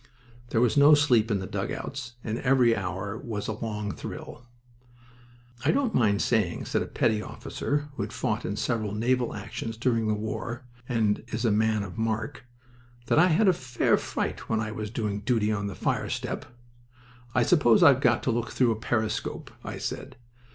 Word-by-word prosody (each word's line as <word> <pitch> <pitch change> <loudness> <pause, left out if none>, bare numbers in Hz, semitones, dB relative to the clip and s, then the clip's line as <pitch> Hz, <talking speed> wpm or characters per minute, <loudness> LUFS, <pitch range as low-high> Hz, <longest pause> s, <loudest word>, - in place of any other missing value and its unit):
There 115 - +2
was 125 +2 +2
no 145 +2 +8
sleep 125 -7 +3
in 105 - +2
the 95 - -4
dugouts, 120 +4 -4
and 110 +1 -3
every 125 -3 +4
hour 95 +2 -4
was 110 -4 -4
a - - -1
long 105 -1 -4
thrill. 120 +5 -8 1.2
"I - - +2
don't 265 -5 +2
mind 105 -4 +3
saying," 105 -7 0
said - - 0
a - - -3
petty 110 -1 +1
officer 145 +6 -3
who - - -5
had - - -3
fought - - -2
in - - -3
several 110 -3 -1
naval 120 +3 +1
actions 110 +2 -5
during 115 -2 +1
the 105 - +2
war 110 +4 -4 0.2
and 110 -4 +1
is 115 +2 -3
a 115 - +3
man 110 0 +2
of 100 +2 -7
mark, 110 +5 -2 0.6
"that - - +4
I 175 - +7
had 190 +5 +3
a 185 - +6
fair 130 -6 +1
fright - - -3
when 110 - +1
I 110 0 -2
was 110 -1 -4
doing 105 -2 -2
duty 110 0 +1
on 100 -1 -1
the 100 - -5
fire - - -1
step. - - -3 0.9
'I 120 - +4
suppose 135 -4 +5
I've 140 -5 +7
got 120 -3 +3
to 130 - +1
look 115 0 -1
through 125 -3 +2
a 110 - -1
periscope,' 110 -1 -2
I - - -5
said. - - -5
115 Hz, 185 wpm, -27 LUFS, 105-125 Hz, 1.2 s, no